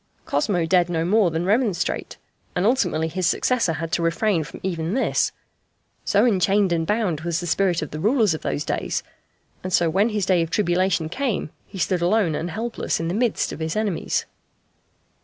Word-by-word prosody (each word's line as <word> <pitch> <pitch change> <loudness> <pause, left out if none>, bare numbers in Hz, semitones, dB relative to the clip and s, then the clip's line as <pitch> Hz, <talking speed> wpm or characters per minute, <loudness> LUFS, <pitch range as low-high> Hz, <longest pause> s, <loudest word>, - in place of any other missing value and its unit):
Cosmo 170 +4 0
dared 175 0 +3
no 165 -1 0
more 205 0 +3
than 165 +2 -2
remonstrate, 205 -3 0 0.4
and 180 - +1
ultimately 180 -10 +2
his 180 +2 -1
successor 230 -4 +1
had 160 +2 -4
to - - 0
refrain 170 +1 +1
from - - -10
even 175 0 -2
this, 265 - +1 0.7
so 205 +3 +3
enchained 195 -3 +3
and 165 -1 -1
bound 205 -8 0
was 170 0 -1
the 175 - -5
spirit 175 -1 +1
of 155 - -7
the 155 - -5
rulers 215 - +3
of 155 - -5
those 145 - -2
days; - - -2 0.6
and 185 - -4
so 170 -2 +3
when 200 +6 +2
his 210 -4 -1
day 185 -2 +3
of 165 - -2
tribulation 180 -3 +1
came 230 - -2 0.2
he - - -10
stood 175 0 0
alone 180 -1 +2
and 165 +3 -3
helpless 225 +6 -2
in 165 0 -2
the - - -1
midst 230 +1 0
of - - -7
his 160 0 -2
enemies. 210 -5 -1
180 Hz, 190 wpm, -23 LUFS, 165-210 Hz, 0.7 s, dared